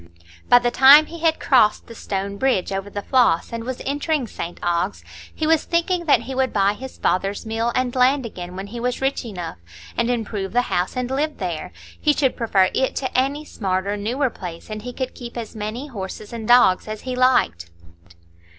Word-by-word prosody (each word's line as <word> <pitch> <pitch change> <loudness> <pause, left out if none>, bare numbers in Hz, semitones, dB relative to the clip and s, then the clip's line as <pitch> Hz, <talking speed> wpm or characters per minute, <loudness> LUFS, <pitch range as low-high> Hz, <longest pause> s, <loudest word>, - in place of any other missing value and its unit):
By 245 - +8
the 240 0 +1
time 280 +5 +8
he 335 +2 -10
had 320 -1 +2
crossed 225 -6 +3
the 230 - -11
stone 200 -2 -4
bridge 245 -7 +1
over 195 +1 -3
the 205 0 -5
Floss 245 -8 +2
and 230 0 -4
was 255 +1 -5
entering 290 0 -1
St 175 -5 -6
Ogg's, 170 - -1 0.3
he 315 - -3
was 320 0 +3
thinking 345 +1 0
that 295 - +4
he 265 - -6
would 260 0 0
buy 200 0 +2
his 260 +4 -9
father's 195 +4 -1
mill 225 +2 -1
and 255 -1 0
land 260 +1 +3
again 180 -5 -7
when 190 +1 -5
he 230 +4 -7
was 245 +1 -2
rich 270 +1 -1
enough, 180 - -7 0.4
and 235 - 0
improve 215 -5 -2
the 245 +1 +3
house 180 +7 -1
and 250 0 -2
live 295 +3 -1
there; 175 - -4 0.3
he 300 - +3
should 270 -3 +1
prefer 195 -5 +2
it 265 - 0
to 260 - -3
any 280 +4 0
smarter, 195 -4 -2
newer 240 +6 -1
place, 175 0 -9
and 215 0 -5
he 250 +3 -6
could 260 0 -4
keep 240 -1 -9
as 230 -2 -6
many 215 +5 -4
horses 210 -4 -7
and 225 -2 -6
dogs 240 -7 +5
as 215 0 -6
he 255 -1 -4
liked. 250 - +2
235 Hz, 205 wpm, -22 LUFS, 200-265 Hz, 0.4 s, By